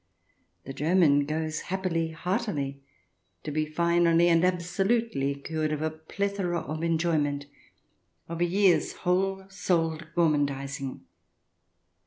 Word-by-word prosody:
The 135 - -7
German 150 -2 +3
goes 155 0 -2
happily, 180 -3 -1
heartily, 160 - -2 0.6
to 150 - -4
be 155 +1 0
finally 170 +1 +3
and 165 0 +4
absolutely 180 - 0
cured 155 +2 -3
of 150 0 -2
a 160 - 0
plethora 175 +3 -2
of 155 +2 -5
enjoyment, 160 -4 0 0.8
of 170 +1 -5
a - - +5
year's 190 +1 +3
whole 190 +1 0
souled 165 -4 -1
gormandizing. 140 -4 0
165 Hz, 110 wpm, -27 LUFS, 150-180 Hz, 0.8 s, a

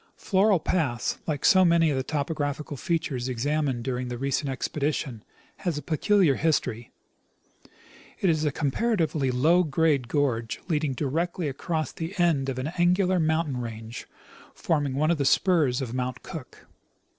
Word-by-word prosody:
Floral 195 -1 +3
pass, 140 -9 -1
like 150 -3 -2
so 190 -1 +6
many 170 -2 +4
of - - 0
the 130 - 0
topographical 145 0 -3
features 135 -5 -2
examined 135 0 -1
during 125 0 -2
the 125 0 -4
recent 135 +2 -1
expedition, 135 -3 -2 0.3
has 175 -5 -2
a - - -3
peculiar 180 0 +3
history. 125 -7 0 1.3
It 195 - +1
is 155 -3 +2
a 150 - +1
com 145 0 -1
paratively 160 - 0
low 160 +9 +4
grade 150 -4 +1
gorge 125 -5 -1
leading 150 -5 0
directly 160 +6 -2
across 155 +3 -2
the 170 +5 -6
end 155 -6 +2
of 130 - -3
an 135 +5 -3
angular 180 +1 +3
mountain 160 -4 0
range 115 0 -7 0.5
forming 145 -5 0
one 155 +4 +2
of 170 - 0
the - - +2
spurs 145 -3 +3
of 120 -2 -5
Mount 130 0 -3
Cook. 155 -8 -9
150 Hz, 155 wpm, -26 LUFS, 130-165 Hz, 1.3 s, so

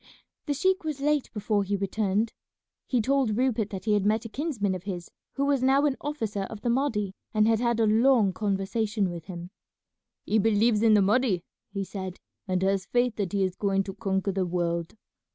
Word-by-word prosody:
The 290 - 0
sheik 375 +5 +1
was 305 -3 -3
late 295 0 +1
before 210 -1 0
he 200 +1 -1
returned. 200 +2 0 0.5
He 250 -3 +2
told 265 -4 +1
Rupert 240 -5 +1
that 190 -1 -6
he 215 - +2
had 205 -2 +2
met 215 +2 +1
a - - -5
kinsman 235 - -1
of 185 - -4
his 180 -4 -5 0.2
who 280 - 0
was 280 -2 +2
now 270 +3 +4
an 280 -3 +2
officer 225 -9 -3
of 215 +1 -9
the 240 - +1
Mahdi, 225 -7 0 0.2
and 215 0 +4
had 225 -1 +3
had 235 -1 +1
a 225 - +4
long 220 -2 +4
conversation 205 0 -1
with 170 -2 -7
him. 175 -1 -8 0.7
"He 220 - +2
believes 215 +1 +3
in 225 -2 +5
the 205 - +5
Mahdi," 205 -3 +2 0.3
he 195 0 -2
said, 190 -1 -6 0.3
"and 185 0 0
has 195 0 +1
faith 245 -2 +1
that 195 -5 -2
he 200 -1 +2
is 185 -1 0
going 195 -1 +1
to 195 - -6
conquer 195 -1 -1
the 190 0 0
world. 170 -1 -2
210 Hz, 205 wpm, -27 LUFS, 195-240 Hz, 0.7 s, in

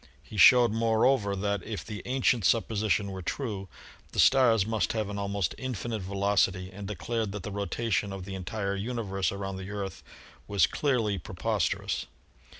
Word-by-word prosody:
He - - -12
showed, 120 +3 +7
moreover, 115 -1 +2
that 100 0 -1
if 105 +2 -6
the 105 -2 -6
ancient 125 -3 +2
supposition 105 -2 +1
were 95 -1 -6
true, 100 -1 -4 0.4
the - - -3
stars 120 -7 +5
must 110 0 0
have 110 -3 -2
an 100 0 -4
almost 100 -3 -1
infinite 120 -4 -3
velocity 95 -1 +1
and 100 0 -7
declared 105 +2 -2
that 105 -3 -5
the 105 - -5
rotation 100 +1 -1
of 95 -2 -6
the 95 - -6
entire 100 +1 -3
universe 100 -4 -2
around 95 -1 -4
the 95 +1 -7
Earth 100 -3 -5 0.5
was 100 -1 +4
clearly 115 -9 0
pre - - -9
posterous. - - -1
100 Hz, 160 wpm, -28 LUFS, 95-115 Hz, 0.5 s, showed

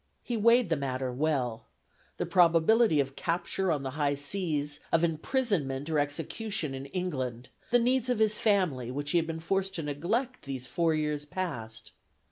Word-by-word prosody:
He 240 - -2
weighed 230 0 +4
the - - +4
matter 130 -2 -2
well: 130 -5 -1 0.5
the - - -1
probability 175 +2 +4
of 135 -1 -1
capture 175 +2 -1
on 145 -3 -1
the 135 - -3
high 145 0 0
seas, 145 -1 -2
of 165 0 +3
imprisonment 165 - 0
or 155 - +2
execution 155 +3 -2
in 135 +1 -6
England: 130 -9 -3 0.2
the 245 - +5
needs 250 +1 +2
of 250 - +2
his 215 -1 +3
family, 180 - +1
which 145 +3 -3
he 175 - +4
had 165 - -2
been 165 0 -4
forced 195 +3 -1
to 165 - -3
neglect 205 - -2
these 135 -2 -5
four 165 +4 +1
years 150 -1 -1
past. 115 - -5
160 Hz, 170 wpm, -29 LUFS, 140-195 Hz, 0.5 s, the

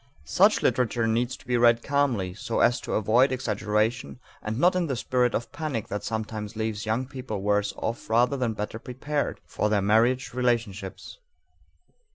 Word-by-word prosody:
Such 205 +4 +3
literature 120 -2 +1
needs 120 +3 0
to - - -20
be 125 -1 +1
read 120 -1 +4
calmly 130 -10 0
so 110 +3 -3
as 120 - +3
to - - -5
avoid 115 +6 +3
exaggeration 110 0 -1 0.2
and 110 +1 -4
not 175 +6 +4
in 180 -2 +1
the 135 - -1
spirit 125 0 +1
of 120 - -3
panic 150 -9 -4
that 105 0 -4
sometimes 110 0 -4
leaves 110 -1 -3
young 115 +4 0
people 125 -7 -6
worse 105 0 +1
off 115 0 -4
rather 120 +4 +3
than 125 -4 -1
better 105 +1 -5
prepared 145 +5 -3
for 105 - -1
their 105 -1 +2
marriage 115 +6 +2
relationships. 115 - -2
115 Hz, 170 wpm, -26 LUFS, 105-130 Hz, 0.2 s, read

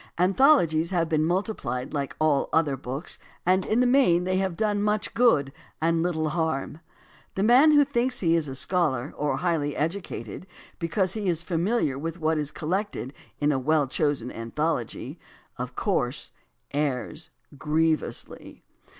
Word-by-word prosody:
Anthologies 180 - +4
have 175 -3 +1
been 155 -1 +1
multiplied 165 - -2
like 140 -2 -3
all 155 -3 +2
other 155 -4 +2
books, 135 +5 -5 0.3
and 185 +1 +2
in 225 +3 +2
the - - +4
main 245 -10 +4
they 185 +1 0
have 190 -2 -1
done 210 -2 0
much 210 0 0
good 145 - +3 0.3
and 165 +1 +1
little 160 -3 0
harm. 160 -2 -2 0.6
The 190 - 0
man 250 +8 +6
who 290 -1 +6
thinks 255 -2 0
he 165 -3 +2
is 160 -3 0
a 135 - -5
scholar 150 -4 0
or 150 0 -1
highly 160 -5 -1
educated 165 - -4 0.3
because 180 +3 0
he 210 -4 -2
is 165 -1 -1
familiar 170 - 0
with 165 +3 -5
what 160 0 +1
is 150 -1 -2
collected 170 - -3 0.3
in 145 0 +2
a 135 - 0
well 150 +1 +2
chosen 135 -3 -1
anthology, 120 +3 -3 0.4
of - - -5
course - - -1 0.4
errs 145 +2 -2 0.3
grievously. 155 +2 -1
165 Hz, 150 wpm, -26 LUFS, 145-190 Hz, 0.6 s, man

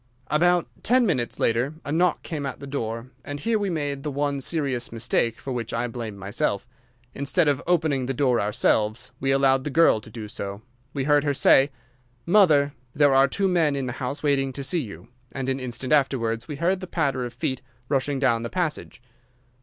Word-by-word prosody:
"About 175 +2 +3
ten 250 +1 +3
minutes 130 - -1
later 120 +6 +1
a 145 - -4
knock 170 +1 +2
came 150 -3 -4
at 135 - -5
the - - -8
door, 115 -3 -4
and 145 0 -6
here 225 +7 +1
we 200 -1 -1
made 145 -4 -2
the 150 - -3
one 140 0 -1
serious 135 -5 -1
mistake 115 0 0
for 135 - -6
which 115 -2 -3
I 115 +1 0
blame 115 -3 -6
myself. 100 +3 -2 0.5
Instead 140 +4 +1
of 140 -2 +2
opening 155 -7 +1
the 135 - -1
door 125 -3 +2
ourselves, 110 +2 0
we 135 - -1
allowed 135 -1 +3
the 150 - -3
girl 155 -7 +4
to 110 - -13
do 110 -1 -7
so. 100 0 -6 0.3
We 135 -1 -2
heard 145 +1 +3
her 145 -1 0
say, 135 +1 +5 0.6
'Mother, 155 -7 +4 0.2
there 145 -1 +4
are 135 +1 +6
two 195 +8 0
men 165 -6 +2
in 135 -1 -2
the 125 - -3
house 135 +4 -3
waiting 135 -2 +2
to 140 - -5
see 160 +5 0
you,' 100 - -9 0.2
and 135 -1 -4
an 135 0 -1
instant 130 +2 -2
afterwards 120 -5 +1
we 150 - -5
heard 180 +6 +1
the 185 - -7
patter 140 -7 0
of 120 - -4
feet 130 +1 -2 0.3
rushing 140 0 0
down 130 -4 +2
the 115 - -4
passage. 165 -8 -3
135 Hz, 200 wpm, -25 LUFS, 120-150 Hz, 0.6 s, are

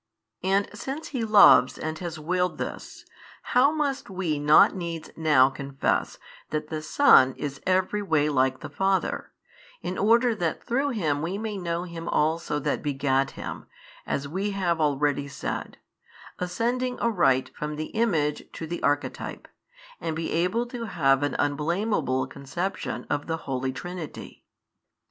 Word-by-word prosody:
And 195 +2 +2
since 270 +9 -5
He 255 -5 -2
loves 215 -2 +7
|576 - - -8
and 155 0 -4
has 175 -2 -5
willed 180 +4 -1
this, - - -6 0.4
how 255 +4 +4
must 285 -5 -2
we 180 -6 -2
not 150 +1 +6
needs 170 -3 -5
now 145 -5 +4
confess 135 0 -1 0.3
that 155 0 -3
the 155 -1 -3
Son 155 - +5
is 140 -1 -5
every 185 +3 +1
way 155 -7 +2
like 130 -2 +1
the - - -6
Father, 195 +5 0 0.5
in 185 - -3
order 235 +3 +4
that 170 -7 -2
through 270 +4 0
Him 155 - -1
we 175 +5 -2
may 215 0 -4
know 170 -2 -2
Him 170 -2 -7
also 155 0 0
That 145 0 -1
begat 135 -2 +1
Him, - - -6 0.4
as 140 0 -2
we 190 +7 -2
have 170 -4 0
already 145 -1 +1
said, 140 - -5 0.6
ascending 240 +8 -1
aright 170 - +2
from 150 0 -4
the 155 +1 -5
Image 165 -11 0
to 165 - -6
the 170 +2 -5
Archetype, 145 0 -2 0.5
and 160 - -3
be 160 0 -3
able 180 +8 +1
to 240 -1 -6
have 135 -9 +2
an 145 - -1
unblameable 150 - 0
conception 170 +9 -4
of 145 - -2
the 165 0 -1
Holy 130 -1 -2
Trinity? 175 +3 -8
165 Hz, 150 wpm, -26 LUFS, 145-200 Hz, 0.6 s, loves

